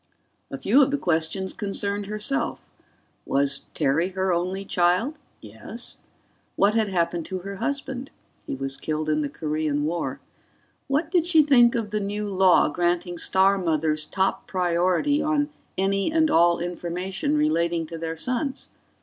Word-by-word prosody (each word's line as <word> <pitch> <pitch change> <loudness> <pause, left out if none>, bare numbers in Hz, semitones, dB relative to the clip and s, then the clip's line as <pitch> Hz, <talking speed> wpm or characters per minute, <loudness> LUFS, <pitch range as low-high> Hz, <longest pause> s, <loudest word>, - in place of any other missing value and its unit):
A 135 - -5
few 240 - +4
of 270 - +4
the 285 - 0
questions 175 - -1
concerned 200 -1 -3
herself: 215 +6 -2 0.6
Was 140 0 0
Terry 155 +4 +1
her 190 -1 +1
only 185 +3 -2
child? 185 - +1 0.2
("Yes.") 110 - -6 0.6
What 205 +2 +3
had 220 -2 +1
happened 170 -2 -1
to 185 -1 -4
her 200 0 -5
husband? 270 +1 -3 0.4
("He - - -3
was 135 0 -3
killed 155 0 -3
in 155 0 +1
the 145 - -2
Korean 150 -1 -2
War.") 170 +2 -2 0.7
What 295 +4 0
did 350 -3 +2
she 325 -3 +6
think 240 -5 +5
of 220 -3 -2
the 215 - 0
new 205 +1 -3
law 190 -2 +4
granting 175 +2 -1
star 195 +1 +3
mothers 155 -3 0
top 190 0 -1
priority 185 - +1
on 300 -1 +1 0.3
any 195 +6 +1
and 315 -1 +3
all 170 +1 +5
information 180 - -2
relating 170 - +1
to 165 +1 -7
their 165 0 -4
sons? 255 - -2
190 Hz, 150 wpm, -24 LUFS, 165-235 Hz, 0.7 s, she